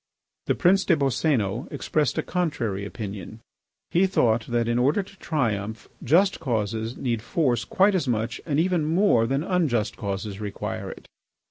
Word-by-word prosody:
The - - +2
Prince 195 +1 +4
des 170 - +4
Boscénos 130 -5 0
expressed 150 -5 0
a - - +1
contrary 120 - -2
opinion. 105 0 -7 0.5
He 185 +3 +4
thought 115 - +2
that, 120 -1 0
in 120 +1 +1
order 145 +11 +2
to 195 0 -17
triumph, 110 -8 -2 0.2
just 185 +9 +3
causes 110 -1 -2
need 120 -4 -1
force 120 -1 0
quite 200 +2 +3
as 175 -7 0
much 115 -1 -1
and 150 -2 0
even 175 -1 +2
more 160 - +3
than 135 +4 0
unjust 155 - 0
causes 100 -1 -4
require 100 -1 -4
it. - - -10
125 Hz, 155 wpm, -25 LUFS, 110-165 Hz, 0.5 s, Prince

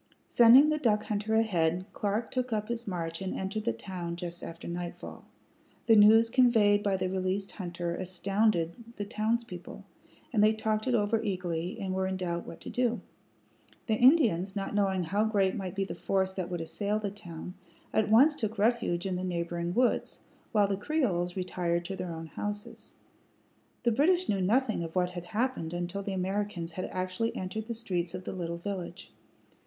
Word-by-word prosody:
Sending 245 +5 +7
the 305 0 +1
duck 215 -6 +2
hunter 215 +1 -1
ahead, 180 -5 +1
Clark 210 +3 -2
took 255 -1 -2
up 215 0 -1
his 235 -1 -3
march 165 -2 -3
and 190 - -3
entered 195 +3 -3
the - - +2
town 170 +7 -5
just 175 0 -6
after 165 0 -8
nightfall. 175 0 -6 0.6
The 225 -2 +6
news 220 +2 +7
conveyed 225 -4 +4
by 200 -2 +1
the 185 - -1
released 190 +1 -2
hunter 175 -2 -4
astounded 185 -1 0 0.2
the 205 - -4
townspeople, 215 -3 -3 0.5
and 210 -3 +4
they 215 +1 +5
talked 220 +1 -1
it 250 - +3
over 220 +1 +1
eagerly, 180 -5 -3
and 190 -1 -3
were 190 0 0
in 190 0 -2
doubt 170 -2 -3
what - - -9
to - - -7
do. 245 -1 +1 0.9
The 220 - 0
Indians, 215 - +4
not 195 0 -3
knowing 195 -3 +1
how 200 +6 +1
great 200 -4 +2
might 190 -3 -5
be 195 0 0
the - - -5
force 190 -1 0
that 185 -2 -4
would 175 -2 -3
assail 200 +6 -1
the 205 -2 -3
town, 180 -3 -8 0.4
at 220 -1 +2
once 270 +8 +6
took 220 -5 -3
refuge 210 -5 +1
in 185 -2 -1
the 180 - -4
neighboring 170 -1 -2
woods, 245 +6 +1 0.3
while 210 -3 +4
the 195 -1 -1
Creoles 195 - 0
retired 175 -2 -1
to 195 - -4
their 180 -2 -4
own 165 0 -6
houses. 205 +5 -6 0.9
The 240 - +3
British 345 +10 +3
knew 195 -2 +1
nothing 220 0 +2
of 165 +1 -7
what 180 -1 +1
had 175 -1 -7
happened 220 -6 -2
until 175 +3 -3
the 200 0 -4
Americans 190 -2 -2
had 185 +3 -4
actually 185 +5 -2
entered 200 +4 -4
the 235 - -3
streets 180 -6 -2
of 185 - -6
the - - -5
little 170 -2 -4
village. 185 0 -6
195 Hz, 185 wpm, -30 LUFS, 175-220 Hz, 0.9 s, Sending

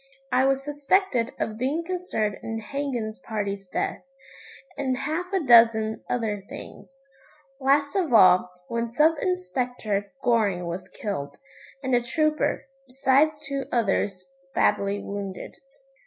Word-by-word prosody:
I 255 +1 +4
was 270 0 +1
suspected 290 -3 +1
of 215 0 -3
being 285 +7 0
concerned 335 - -2
in 225 0 -4
Hagan's 240 -2 -4
party's 200 -5 -4
death, - - -2 0.7
and 260 -2 -1
half 320 +7 -3
a 385 - +2
dozen 225 -2 +5
other 220 -4 -1
things. 280 - -10 0.7
Last 280 +1 +2
of 360 -8 +1
all, 185 -5 +6 0.2
when 235 0 -2
Sub 315 +3 +5
Inspector 200 +3 -2
Goring 205 -7 +2
was 180 +2 -5
killed, 145 -9 -5 0.5
and 260 -1 -1
a 245 - +4
trooper, 305 +3 0 0.2
besides 270 +4 +2
two 275 -1 -3
others 205 -1 0 0.2
badly 200 0 +2
wounded. 200 -2 -6
240 Hz, 125 wpm, -25 LUFS, 205-280 Hz, 0.7 s, all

